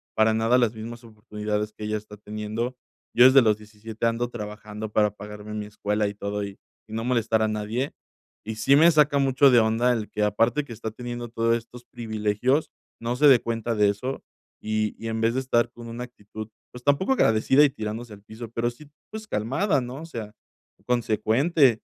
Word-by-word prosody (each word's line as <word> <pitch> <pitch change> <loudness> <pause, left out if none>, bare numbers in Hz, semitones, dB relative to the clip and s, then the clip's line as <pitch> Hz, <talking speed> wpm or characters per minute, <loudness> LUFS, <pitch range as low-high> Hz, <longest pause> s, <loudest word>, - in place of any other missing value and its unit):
para 110 0 +4
nada 115 +3 +3
las 120 -3 +2
mismas 115 +2 -8
oportunidades 105 -1 -4
que - - -10
ella 105 0 -1
está 105 0 -11
teniendo. 105 +4 -4 0.4
Yo 120 - +7
desde 130 +1 +8
los 110 -3 +3
17 110 +1 -7
ando 115 +1 0
trabajando 105 -1 -7
para 105 -1 +2
pagarme 105 +1 -9
mi 105 -1 -4
escuela 105 0 -1
y 100 - -4
todo 100 0 -3
y 100 0 -9 0.3
y 110 - -9
no 115 - -2
molestar 115 -2 +1
a 110 - +2
nadie". 110 +6 -2 0.5
Y 110 0 -4
sí 135 +6 +4
me 165 +3 +7
saca 150 -3 +4
mucho 135 0 +4
de 120 - +7
onda 115 +2 +2
el 110 -3 -2
que, 105 - -1
aparte 115 +7 +2
que 140 - -13
está 110 -1 -5
teniendo 120 +1 -6
todos 115 0 +1
estos 120 +1 -12
privilegios, 115 +4 -1 0.3
no 120 +2 -2
se 150 - +6
dé 130 -4 +7
cuenta 115 0 -2
de 105 -1 +4
eso, 125 +7 -4 0.4
y 110 -1 -1
y 115 - -5
en 110 0 -2
vez 115 +1 +2
de 130 - 0
estar 120 -2 +1
con 120 -1 -10
una 120 +2 -5
actitud, 110 -2 -10 0.2
pues, 125 0 -12
tampoco 145 - +2
agradecida 130 - +4
y - - +3
tirándose 110 -2 -6
al 100 - -13
piso, 110 +2 -9
pero 115 +1 -1
sí, 140 +5 -14 0.2
pues 215 0 -7
calmada, 135 - 0
¿no? 125 +5 -7
O - - -7
sea, 115 -9 -7 0.5
consecuente. 120 +3 +2
115 Hz, 200 wpm, -25 LUFS, 105-125 Hz, 0.5 s, desde